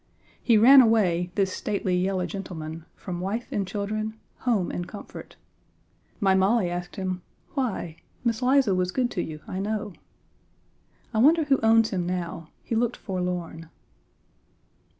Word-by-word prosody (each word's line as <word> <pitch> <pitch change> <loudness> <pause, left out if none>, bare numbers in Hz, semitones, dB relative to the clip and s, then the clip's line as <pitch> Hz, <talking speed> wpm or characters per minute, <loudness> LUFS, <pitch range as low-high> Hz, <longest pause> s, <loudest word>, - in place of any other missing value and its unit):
He 230 -3 +4
ran 260 +5 +9
away, 185 -7 +3
this 195 -2 +1
stately 195 -3 -1
yellow 185 0 0
gentleman, 165 -3 -6
from 175 -2 -6
wife 205 +6 -3
and 195 -2 -1
children, 215 +2 -3 0.2
home 220 -8 0
and 175 0 -4
comfort. 205 - -10 0.8
My 195 -3 +3
Molly 190 0 +3
asked 175 0 -5
him 185 -1 -3 0.3
"Why? 225 - -2 0.3
Miss 230 -1 0
Liza 255 -4 +4
was 180 0 +1
good 250 +1 0
to 175 - -2
you, 155 -2 -6
I 185 - -4
know." 210 0 -3 1.2
I 220 - +1
wonder 315 +7 +5
who 280 -2 +2
owns 225 0 +4
him 180 -3 -1
now; 170 -3 -4
he - - -5
looked 235 +1 0
forlorn. 180 -3 -4
195 Hz, 145 wpm, -26 LUFS, 180-225 Hz, 1.2 s, ran